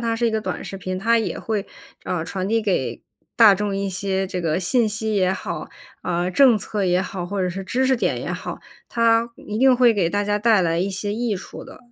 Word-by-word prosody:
它 230 Hz, -1 st, -1 dB
是 235 Hz, +1 st, +1 dB
一 -, -, +2 dB
个 220 Hz, 0 st, -1 dB
短 -, -, -4 dB
视 195 Hz, -, -6 dB
频， 185 Hz, -1 st, -4 dB
它 230 Hz, +4 st, +3 dB
也 210 Hz, -6 st, -2 dB
会， 215 Hz, -3 st, -2 dB, 0.4 s
呃， 170 Hz, -3 st, -2 dB
传 190 Hz, +2 st, -3 dB
递 225 Hz, +1 st, +2 dB
给 205 Hz, -4 st, -1 dB, 0.4 s
大 220 Hz, -4 st, +8 dB
众 200 Hz, 0 st, -2 dB
一 200 Hz, 0 st, -2 dB
些 190 Hz, 0 st, -1 dB
这 185 Hz, -1 st, -4 dB
个 165 Hz, -1 st, 0 dB
信 220 Hz, +5 st, +2 dB
息 215 Hz, +1 st, -2 dB
也 185 Hz, -2 st, +2 dB
好， 190 Hz, -, -5 dB, 0.3 s
啊， 175 Hz, 0 st, -1 dB
政 240 Hz, +3 st, +5 dB
策 205 Hz, 0 st, -3 dB
也 180 Hz, 0 st, +2 dB
好， 185 Hz, -1 st, -4 dB
或 195 Hz, +2 st, -3 dB
者 185 Hz, -, +1 dB
是 190 Hz, +2 st, -5 dB
知 250 Hz, +7 st, 0 dB
识 260 Hz, -, +3 dB
点 -, -, -1 dB
也 -, -, -4 dB
好。 -, -, -5 dB, 0.3 s
它 230 Hz, 0 st, +2 dB
一 210 Hz, -, -6 dB
定 260 Hz, +2 st, +5 dB
会 240 Hz, -2 st, +5 dB
给 180 Hz, -5 st, +1 dB
大 205 Hz, +2 st, 0 dB
家 205 Hz, 0 st, 0 dB
带 220 Hz, -2 st, +4 dB
来 165 Hz, -2 st, +1 dB
一 195 Hz, +2 st, -1 dB
些 205 Hz, +2 st, -3 dB
益 230 Hz, -2 st, -1 dB
处 180 Hz, -, -9 dB
的， -, -, -12 dB
205 Hz, 255 characters per minute, -22 LUFS, 185-225 Hz, 0.4 s, 大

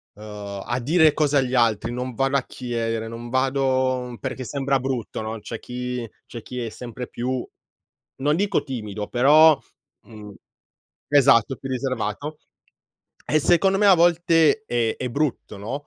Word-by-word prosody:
ehm, 105 Hz, -2 st, -8 dB
a 120 Hz, +1 st, -2 dB
dire 155 Hz, +4 st, +4 dB
cose 145 Hz, -2 st, +2 dB
agli 130 Hz, -1 st, +1 dB
altri, 115 Hz, -1 st, +2 dB
non 125 Hz, +1 st, -4 dB
vado 135 Hz, +4 st, +1 dB
a 130 Hz, -, -1 dB
chiedere, 115 Hz, -3 st, -3 dB
non 120 Hz, +1 st, -8 dB
vado 130 Hz, -2 st, 0 dB
perché 130 Hz, -1 st, -4 dB
sembra 135 Hz, 0 st, 0 dB
brutto" 125 Hz, -4 st, -4 dB
no, 110 Hz, 0 st, -5 dB
c'è 115 Hz, -, -7 dB
chi 125 Hz, -1 st, -5 dB, 0.2 s
c'è 115 Hz, -, -8 dB
chi 125 Hz, -1 st, -7 dB
è -, -, -4 dB
sempre 120 Hz, +2 st, -8 dB
più, 125 Hz, +1 st, -3 dB, 0.8 s
non 150 Hz, +2 st, +2 dB
dico 195 Hz, -7 st, +1 dB
timido, 105 Hz, -6 st, -5 dB
però, 150 Hz, +5 st, +6 dB, 0.5 s
mhmm 105 Hz, -3 st, -11 dB, 0.8 s
esatto, 135 Hz, -3 st, +4 dB
più 135 Hz, -, -8 dB
riservato. 130 Hz, +2 st, -3 dB, 0.9 s
E, 155 Hz, 0 st, +2 dB
secondo 190 Hz, +5 st, +3 dB
me, 205 Hz, -, +3 dB
a 195 Hz, -, +8 dB
volte 170 Hz, +2 st, +3 dB
è 115 Hz, -2 st, 0 dB
è 125 Hz, -, -3 dB
brutto, 140 Hz, -6 st, -2 dB
no, 130 Hz, +8 st, -6 dB
130 Hz, 150 wpm, -23 LUFS, 115-145 Hz, 0.9 s, a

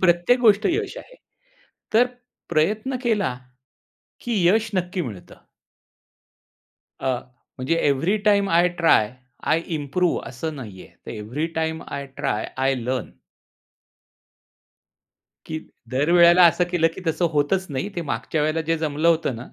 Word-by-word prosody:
प्रत्येक 175 Hz, +7 st, +3 dB
गोष्ट 215 Hz, -3 st, +4 dB
यश 415 Hz, +4 st, -2 dB
आहे. -, -, -11 dB, 0.8 s
तर 240 Hz, +3 st, +6 dB, 0.4 s
प्रयत्न 210 Hz, +11 st, 0 dB
केला 205 Hz, -, 0 dB, 0.8 s
की 225 Hz, -6 st, -1 dB
यश 220 Hz, +3 st, +3 dB
नक्की 180 Hz, +1 st, -1 dB
मिळतं. 100 Hz, -5 st, -11 dB, 1.7 s
अ, 130 Hz, -2 st, 0 dB, 0.4 s
म्हणजे 130 Hz, +6 st, 0 dB
every 165 Hz, +10 st, +1 dB
time 200 Hz, -1 st, +4 dB
I 175 Hz, +2 st, +4 dB
try, 115 Hz, -9 st, +4 dB, 0.3 s
I 165 Hz, -, +2 dB, 0.2 s
improve 160 Hz, +5 st, 0 dB
असं 155 Hz, +6 st, -5 dB
नाहीये. 105 Hz, -8 st, -9 dB, 0.2 s
तर -, -, -6 dB
every 120 Hz, +10 st, -3 dB
time 160 Hz, 0 st, -1 dB
I 140 Hz, 0 st, -5 dB
try, 135 Hz, -7 st, -1 dB
I 135 Hz, +1 st, +2 dB
learn. 125 Hz, -1 st, -3 dB, 2.4 s
की 160 Hz, 0 st, -4 dB, 0.3 s
दर 140 Hz, +6 st, +1 dB
वेळेला 175 Hz, +1 st, +7 dB
असं 175 Hz, +2 st, +3 dB
केलं 165 Hz, -2 st, +3 dB
की -, -, -8 dB
तसं 160 Hz, +2 st, 0 dB
होतच 155 Hz, +6 st, +1 dB
नाही, 140 Hz, +9 st, -2 dB
ते 170 Hz, -, -1 dB
मागच्या 140 Hz, +3 st, -2 dB
वेळेला 155 Hz, +2 st, 0 dB
जे 165 Hz, +1 st, 0 dB
जमलं 155 Hz, +1 st, 0 dB
होतं 160 Hz, -7 st, +1 dB
ना, 120 Hz, -, -8 dB
165 Hz, 135 wpm, -23 LUFS, 135-185 Hz, 2.4 s, वेळेला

